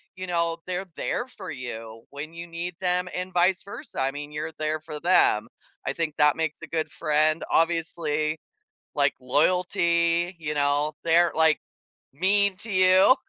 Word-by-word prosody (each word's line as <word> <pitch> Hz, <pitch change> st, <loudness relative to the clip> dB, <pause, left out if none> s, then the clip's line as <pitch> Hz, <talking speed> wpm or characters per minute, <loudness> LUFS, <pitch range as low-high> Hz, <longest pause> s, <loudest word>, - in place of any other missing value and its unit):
you 185 Hz, 0 st, -6 dB
know, 170 Hz, -1 st, 0 dB
they're 185 Hz, +1 st, -3 dB
there 245 Hz, -, -2 dB
for 195 Hz, -7 st, -9 dB
you 115 Hz, -4 st, -7 dB
when 145 Hz, +3 st, -7 dB
you 170 Hz, +1 st, -8 dB
need 170 Hz, +1 st, -5 dB
them 180 Hz, 0 st, +1 dB
and 180 Hz, +1 st, -4 dB
vice 180 Hz, +1 st, +3 dB
versa. 235 Hz, -, -6 dB
I 135 Hz, +1 st, +1 dB
mean, 145 Hz, +1 st, -7 dB
you're 155 Hz, +2 st, -4 dB
there 155 Hz, 0 st, -1 dB
for 155 Hz, -2 st, -7 dB
them. 170 Hz, -11 st, +3 dB, 0.4 s
I 135 Hz, -, -1 dB
think 160 Hz, -1 st, -2 dB
that 150 Hz, 0 st, +5 dB
makes 160 Hz, -1 st, -3 dB
a -, -, -8 dB
good 160 Hz, -1 st, -2 dB
friend. 155 Hz, 0 st, +1 dB
Obviously, 165 Hz, -2 st, +1 dB, 0.6 s
like, 145 Hz, -1 st, +2 dB
loyalty, 170 Hz, +4 st, +2 dB
you 155 Hz, -2 st, -3 dB
know, 145 Hz, +1 st, +1 dB
they're, 170 Hz, +1 st, +4 dB
like, 160 Hz, -1 st, +4 dB, 0.6 s
mean 200 Hz, +5 st, +2 dB
to 220 Hz, +3 st, -5 dB
you. 185 Hz, +5 st, +6 dB
165 Hz, 165 wpm, -25 LUFS, 150-180 Hz, 0.6 s, you